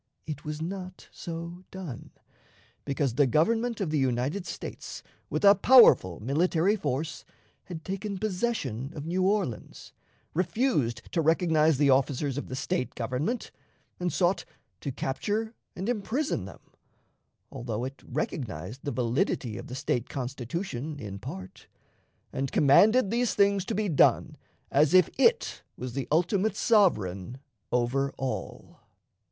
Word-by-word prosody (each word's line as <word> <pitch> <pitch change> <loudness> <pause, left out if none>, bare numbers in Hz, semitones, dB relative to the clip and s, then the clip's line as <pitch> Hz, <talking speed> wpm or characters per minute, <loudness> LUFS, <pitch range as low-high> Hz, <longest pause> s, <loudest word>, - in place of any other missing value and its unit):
It 150 -3 -6
was 150 +1 -4
not 185 +1 -7
so 170 +1 -7
done, 180 -11 -8 0.8
because 140 -3 0
the 140 +2 +3
Government 225 - +1
of 185 -7 -1
the 155 - +1
United 135 +8 0
States, - - -7 0.3
with - - 0
a 200 - +10
powerful 200 - +6
military 165 - +2
force, 150 -3 -3 0.4
had 165 -3 -8
taken 195 +1 -4
possession 180 - -2
of 150 -1 -6
New 180 +3 -1
Orleans, 190 - -1 0.4
refused 165 - 0
to 165 - +1
recognize 160 -2 +3
the 140 -1 +4
officers 135 +1 +1
of - - -7
the 130 - -5
State 135 +1 -2
government, 130 - -2 0.5
and 180 -1 -1
sought 185 +1 +1 0.4
to 140 - -4
capture 210 - -2 0.2
and 190 +3 -4
imprison 240 - -1
them, 95 - -11 0.9
although 115 -1 -4
it 135 +1 -6
recognized 120 - -4
the 145 - -2
validity 120 -1 0
of - - -7
the 125 - -6
State 125 -2 -1
Constitution 135 - -4
in 100 -5 -7
part, 95 -5 -9 0.7
and 135 0 -2
commanded 205 - +5
these 240 0 +1
things 200 -1 +3
to - - -2
be 210 +1 0
done 160 -7 +3 0.4
as 150 +4 +4
if 185 -2 +6
it 465 - +3 0.2
was 125 -1 -5
the 135 0 -3
ultimate 185 +6 +2
sovereign 120 - +2 0.3
over 130 +3 +1
all. 130 -1 -5
155 Hz, 135 wpm, -28 LUFS, 130-190 Hz, 0.9 s, a